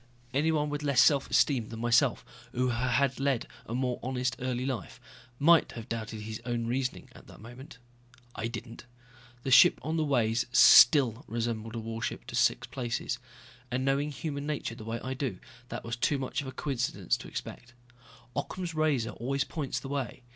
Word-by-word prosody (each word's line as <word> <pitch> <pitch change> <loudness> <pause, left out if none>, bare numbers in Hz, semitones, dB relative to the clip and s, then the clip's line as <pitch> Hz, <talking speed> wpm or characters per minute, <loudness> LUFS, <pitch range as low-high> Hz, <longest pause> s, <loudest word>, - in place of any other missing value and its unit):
Anyone 150 +1 +1
with 145 0 -3
less 140 -3 +2
self 140 -4 +5
esteem 125 -7 +2
than 115 - -7
myself 120 +1 +2 0.3
or - - -3
who 125 0 +2
had 125 +2 +1
led 135 -3 0 0.2
a 115 - -4
more 125 -1 -1
honest 125 0 -1
early 125 0 -2
life 130 -4 -4 0.4
might 165 +4 +4
have 115 -1 -8
doubted 110 -2 -5
his 110 +1 -6
own 120 -1 -2
reasoning 125 +2 -2
at - - -16
that - - -14
moment. 120 +4 -11 0.6
I 105 +3 -3
didn't. 115 0 -8 0.6
The 135 - -2
ship 130 0 +7
on 160 +4 -2
the 160 - +2
ways 120 -5 +1
still 130 0 +7
resembled 115 -1 -3
a - - -2
warship 115 0 -4
to - - -7
six - - +2
places. 125 -1 -3 0.5
And 130 0 -1
knowing 140 +2 +1
human 145 0 -5
nature 150 -6 -3
the 110 -1 -10
way 115 +1 -3
I 130 - -3
do, 130 0 -3 0.3
that - - -5
was 115 0 -3
too 140 +4 +1
much 135 0 -3
of 140 - -8
a - - -5
coincidence 130 - -1
to - - -10
expect. 120 0 -8 0.6
Occam's 170 +5 -4
razor 150 -7 +1
always 135 +4 -1
points 150 -5 -4
the - - -8
way. 135 -3 -4
125 Hz, 185 wpm, -29 LUFS, 115-140 Hz, 0.6 s, ship